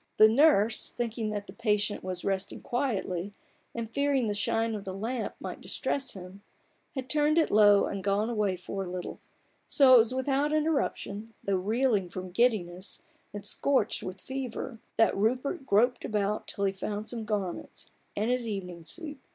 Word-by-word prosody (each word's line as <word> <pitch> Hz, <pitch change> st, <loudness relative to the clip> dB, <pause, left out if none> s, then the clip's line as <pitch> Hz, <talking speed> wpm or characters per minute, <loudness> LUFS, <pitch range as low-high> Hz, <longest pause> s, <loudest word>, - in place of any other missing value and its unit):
The 215 Hz, -, +9 dB
nurse, 225 Hz, -3 st, +4 dB
thinking 230 Hz, -2 st, -3 dB
that 205 Hz, -1 st, -3 dB
the -, -, -11 dB
patient 210 Hz, -2 st, 0 dB
was 185 Hz, -1 st, -4 dB
resting 195 Hz, -1 st, -2 dB
quietly, 205 Hz, -7 st, -2 dB, 0.4 s
and 230 Hz, -1 st, -3 dB
fearing 280 Hz, +1 st, +1 dB
the 210 Hz, -, 0 dB
shine 225 Hz, +2 st, 0 dB
of 210 Hz, -2 st, -4 dB
the 190 Hz, -1 st, -5 dB
lamp 230 Hz, +4 st, -3 dB
might -, -, -6 dB
distress 270 Hz, -2 st, -2 dB
him, 190 Hz, +1 st, -10 dB, 0.5 s
had 260 Hz, -1 st, -4 dB
turned 300 Hz, +2 st, +2 dB
it 325 Hz, -, +3 dB
low 205 Hz, -1 st, +6 dB
and 195 Hz, -1 st, -4 dB
gone 200 Hz, +2 st, +1 dB
away 210 Hz, -5 st, 0 dB
for 190 Hz, +2 st, -5 dB
a 180 Hz, -, -6 dB
little: 180 Hz, 0 st, -5 dB, 0.5 s
so 270 Hz, -3 st, +6 dB
it -, -, +11 dB
was 225 Hz, +1 st, +3 dB
without 275 Hz, +3 st, +1 dB
interruption, 275 Hz, -8 st, -1 dB
although 195 Hz, -2 st, +2 dB
reeling 215 Hz, -1 st, +1 dB
from 185 Hz, 0 st, -6 dB
giddiness, 190 Hz, -4 st, 0 dB, 0.3 s
and 205 Hz, 0 st, -7 dB
scorched 265 Hz, -6 st, +1 dB
with 185 Hz, +1 st, -6 dB
fever, 260 Hz, -1 st, -5 dB, 0.2 s
that 225 Hz, -, +4 dB
Rupert 255 Hz, -, 0 dB
groped 240 Hz, +5 st, +3 dB
about 210 Hz, -1 st, -1 dB
till 200 Hz, -, -2 dB
he 195 Hz, -, +1 dB
found 205 Hz, +2 st, -4 dB
some 235 Hz, -2 st, -4 dB
garments, 205 Hz, -5 st, -4 dB, 0.2 s
and 215 Hz, +4 st, 0 dB
his 250 Hz, -2 st, 0 dB
evening 180 Hz, -5 st, -5 dB
suit. 295 Hz, -, -6 dB
215 Hz, 170 wpm, -29 LUFS, 195-250 Hz, 0.5 s, it